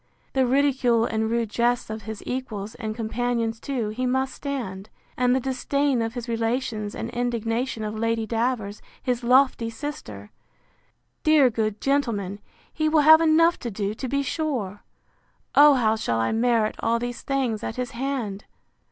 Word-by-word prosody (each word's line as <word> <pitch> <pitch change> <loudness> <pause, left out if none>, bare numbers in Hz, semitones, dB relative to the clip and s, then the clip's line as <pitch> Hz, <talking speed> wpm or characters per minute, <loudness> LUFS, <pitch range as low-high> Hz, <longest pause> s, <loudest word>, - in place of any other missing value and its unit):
The 265 -2 +2
ridicule 255 -3 +3
and 220 -1 -1
rude 230 -2 -1
jests 240 -1 0
of 220 0 -5
his 220 0 -7
equals, 220 -5 -4
and 220 -3 -5
companions 230 0 -1
too, 245 -6 -2
he 250 +4 -2
must 265 +1 0
stand: 225 -9 -5 0.3
And 250 0 +2
the - - +2
disdain 265 0 0
of 225 +1 -3
his 245 0 -5
relations, 225 -2 -2
and 230 - -5
indignation 235 0 -2
of 210 0 -3
Lady 225 0 -1
Davers, 225 -2 -2 0.2
his 250 -2 -1
lofty 250 -2 +3
sister! 165 - -7 0.9
Dear 300 -5 +5
good 215 -2 -1
gentleman! 225 -9 -1 0.3
he 310 -1 +1
will 310 -1 +4
have 315 +2 +8
enough 330 +1 +4
to 240 - -4
do, 205 -1 -2
to 260 +4 -5
be 280 +2 0
sure! 250 - -3 0.7
O 290 0 +8
how 220 -4 +2
shall 165 - -1
I 115 0 +1
merit 225 -1 +2
all 230 +1 +1
these 245 0 -4
things 255 -6 -1
at 225 - -4
his 250 +1 -3
hand! 240 -6 -3
235 Hz, 160 wpm, -24 LUFS, 220-265 Hz, 0.9 s, have